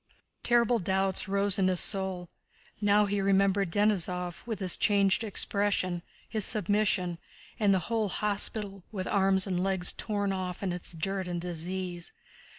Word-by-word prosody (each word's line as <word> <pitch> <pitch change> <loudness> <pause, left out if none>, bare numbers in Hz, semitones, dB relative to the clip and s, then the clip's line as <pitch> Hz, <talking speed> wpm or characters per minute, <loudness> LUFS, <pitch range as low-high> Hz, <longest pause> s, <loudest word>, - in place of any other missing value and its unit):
Terrible 240 0 +3
doubts 190 +1 0
rose 200 0 +3
in 190 - +3
his 185 -1 +3
soul. 190 -3 +1 0.5
Now 205 0 +4
he 200 0 -1
remembered 195 -1 +2
Denísov 180 -3 0
with 225 -3 -3
his 185 -2 +3
changed 200 +1 +2
expression, 200 -4 0 0.3
his 215 -2 -1
submission, 200 -4 +1 0.4
and 205 -2 +3
the 190 - +4
whole 225 -3 -1
hospital, 205 0 -2
with 190 -3 -4
arms 190 -1 +2
and 180 -3 -1
legs 190 -2 +3
torn 205 -2 -2
off 185 0 -5
and 185 -3 -1
its 175 0 -7
dirt 190 +3 -2
and 175 -1 -3
disease. 175 +1 -5
195 Hz, 150 wpm, -29 LUFS, 180-205 Hz, 0.5 s, Now